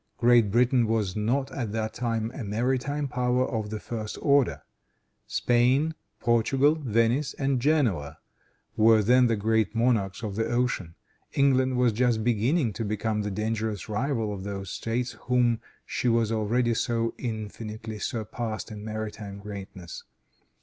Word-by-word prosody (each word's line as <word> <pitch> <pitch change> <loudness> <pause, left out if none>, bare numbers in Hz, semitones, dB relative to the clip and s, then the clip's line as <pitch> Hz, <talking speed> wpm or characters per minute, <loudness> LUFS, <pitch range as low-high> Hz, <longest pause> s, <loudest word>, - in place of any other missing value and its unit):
Great 120 -3 +5
Britain 120 +2 +3
was 110 -4 0
not, 120 +6 0
at 120 -6 -3
that 110 -1 -2
time, 115 -1 -2
a 130 - -6
maritime 130 +7 -1
power 125 0 +1
of 110 -4 -3
the 110 0 -4
first 110 -1 -5
order. 140 -4 +2 0.6
Spain, 125 +6 +2 0.3
Portugal, 130 +5 +3
Venice 125 0 +1
and 135 -2 0
Genoa 120 - +1 0.6
were 110 -1 +5
then 125 +3 +5
the 115 - +2
great 110 0 +1
monarchs 115 -3 +1
of 105 -3 -3
the 110 - 0
ocean. 120 -9 -1 0.4
England 130 -2 +3
was 125 -2 +3
just 115 -1 +1
beginning 120 +3 +1
to 115 - -4
become 105 +1 -1
the 105 - -2
dangerous 110 0 -2
rival 110 -1 -1
of 95 -2 -6
those 100 -2 -5
States 120 +2 -2 0.2
whom 120 -2 +3 0.3
she - - -2
has 115 -2 +2
already 115 +2 +1
so 115 0 0
infinitely 110 -1 -5
surpassed 110 +1 -4
in 105 -1 -7
maritime 110 -2 -5
greatness. 100 -4 -8
115 Hz, 145 wpm, -27 LUFS, 105-125 Hz, 0.6 s, Great